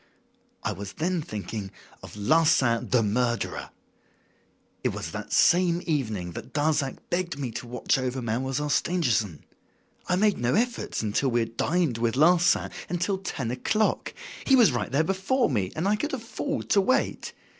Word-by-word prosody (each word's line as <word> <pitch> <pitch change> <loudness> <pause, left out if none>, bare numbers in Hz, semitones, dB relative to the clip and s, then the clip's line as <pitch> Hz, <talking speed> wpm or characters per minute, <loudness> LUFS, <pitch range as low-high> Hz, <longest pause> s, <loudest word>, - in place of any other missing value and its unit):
"I - - 0
was 100 +2 -7
then 175 +1 -1
thinking 105 - -5 0.3
of - - -11
Larsan, 130 -1 +3
the 125 -3 +3
murderer. 120 +3 -1 1.1
It - - +2
was - - -5
that - - -7
same 175 0 +4
evening 110 - -2
that - - -9
Darzac 145 -2 0
begged 175 -4 -1
me 135 -4 -3
to 120 +2 -6
watch 125 +2 0
over 130 0 -2
Mademoiselle 130 +5 -2
Stangerson. 115 - 0 0.6
I 180 - +2
made 205 +1 +2
no 120 +1 +1
efforts 235 - -1
until 110 +6 0
after - - +3
we 120 -1 +1
had 115 0 -4
dined 160 -4 0
with 115 0 0
Larsan, 170 +4 +4 0.2
until 180 +3 -1
ten 135 -11 -4
o'clock. 215 - 0 0.3
He 270 - +5
was 230 - +6
right 120 -1 -2
there 140 +4 +3
before 195 - +1
me, 100 -6 0
and 160 +5 -1
I 210 - +3
could 300 +6 -3
afford 265 +4 -4
to 200 - +5
wait. 255 +7 0
145 Hz, 165 wpm, -26 LUFS, 115-180 Hz, 1.1 s, was